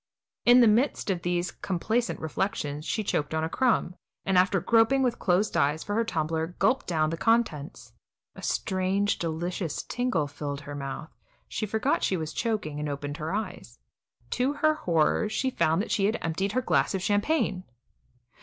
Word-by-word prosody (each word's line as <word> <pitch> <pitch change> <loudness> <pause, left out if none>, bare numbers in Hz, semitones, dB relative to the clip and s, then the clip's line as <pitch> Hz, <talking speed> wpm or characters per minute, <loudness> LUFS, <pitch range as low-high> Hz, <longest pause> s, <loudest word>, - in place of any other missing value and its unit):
In 245 +1 +8
the 235 - +7
midst 220 -1 +2
of 180 -2 -2
these 175 +1 -1
complacent 220 +6 -1
reflections 155 -2 -2
she 215 - -1
choked 155 -5 -1
on 160 - 0
a 160 - -1
crumb, 240 -5 +1 0.3
and, 195 - +1
after 185 +1 +4
groping 230 +7 +3
with 245 -2 0
closed 190 +3 +1
eyes 150 +2 +2
for 205 - -4
her 230 +2 +2
tumbler, 160 -3 -2
gulped 265 - +2
down 155 -3 +1
the 165 - -3
contents. 155 - 0 0.4
A - - -11
strange, 190 +2 0
delicious 170 0 -3
tingle 245 -11 -1
filled 145 0 -5
her 145 +1 -8
mouth; 140 +2 -6 0.4
she 215 - -3
forgot 220 - 0
she 190 - +1
was 160 -1 -4
choking, 205 -11 -2
and 150 0 -2
opened 145 +1 -4
her 160 -1 -4
eyes. 190 - -5 0.5
To 255 +3 +1
her 310 +1 +3
horror, 175 - +1
she 260 +4 -1
found 165 -4 +2
that - - -7
she 195 - +2
had 220 +3 +1
emptied 190 +5 -1
her 255 - +1
glass 205 - +2
of 190 - -3
champagne. 205 - +1
185 Hz, 175 wpm, -27 LUFS, 155-225 Hz, 0.5 s, In